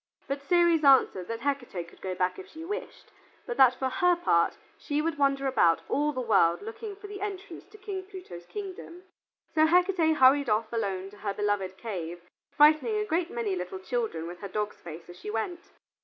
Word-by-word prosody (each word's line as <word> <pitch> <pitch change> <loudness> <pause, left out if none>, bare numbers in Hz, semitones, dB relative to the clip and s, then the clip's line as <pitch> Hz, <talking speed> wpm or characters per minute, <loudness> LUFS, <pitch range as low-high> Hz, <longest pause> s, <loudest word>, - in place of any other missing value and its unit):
But 275 0 -3
Ceres 340 0 +3
answered 260 -10 +5
that 230 0 -5
Hecate 245 -11 -3
could - - -18
go 185 -1 -3
back 180 - -1
if 380 - -9
she 320 +1 -9
wished, 415 +4 -7 0.3
but 485 - -4
that 255 -1 +6
for 265 - -1
her 360 +6 +3
part 170 - +2 0.2
she 290 -1 -2
would 320 -1 -1
wander 275 -1 +2
about 170 -11 +3
all 295 +1 +1
the 260 - -4
world 195 -7 +3
looking 400 - -7
for 410 +2 -13
the 405 -1 -8
entrance 395 -3 -6
to 410 +3 -16
King 395 -2 -5
Pluto's 180 - -10
kingdom. 370 -3 -8 0.5
So 315 0 +5
Hecate 350 -2 +3
hurried 270 0 +5
off 220 +2 0
alone 195 -4 -2
to 205 - -15
her 200 -1 -3
beloved 200 -2 -1
cave, 175 -6 -6 0.3
frightening 305 +9 +4
a 425 - 0
great 340 -2 0
many 225 -5 -2
little 180 +1 -5
children 190 -4 -3
with 175 +1 -8
her 200 - -6
dog's 210 +2 -4
face 165 0 -9
as 175 +1 -12
she - - -7
went. 280 +11 -4
265 Hz, 200 wpm, -28 LUFS, -, 0.5 s, that